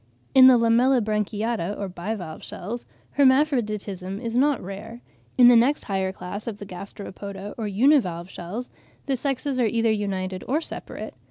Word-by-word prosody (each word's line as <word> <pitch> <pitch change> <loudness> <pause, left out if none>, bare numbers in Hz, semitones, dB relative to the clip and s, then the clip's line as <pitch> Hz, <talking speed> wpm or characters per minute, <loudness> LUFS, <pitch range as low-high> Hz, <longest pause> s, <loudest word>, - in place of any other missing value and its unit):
In 260 -1 +9
the 255 -1 +8
Lamellibranchiata, 225 -4 +1
or 200 - -3
bivalve 180 -2 -6
shells, 235 +3 -6 0.3
hermaphroditism 215 - +2
is 230 -1 -4
not 280 +2 +3
rare. 205 +5 -8 0.4
In 245 -1 +8
the 245 - +8
next 250 +6 +3
higher 190 -2 -1
class 195 +3 -7
of 220 -3 -4
the 205 - -8
Gasteropoda, 200 +1 -8
or 220 -3 -3
univalve 200 - +2
shells, 190 +7 -7 0.3
the 275 - 0
sexes 270 0 -2
are 245 - +3
either 230 0 +1
united 190 -3 -2
or 285 +5 +1
separate. 330 - -7
215 Hz, 150 wpm, -24 LUFS, 195-250 Hz, 0.4 s, In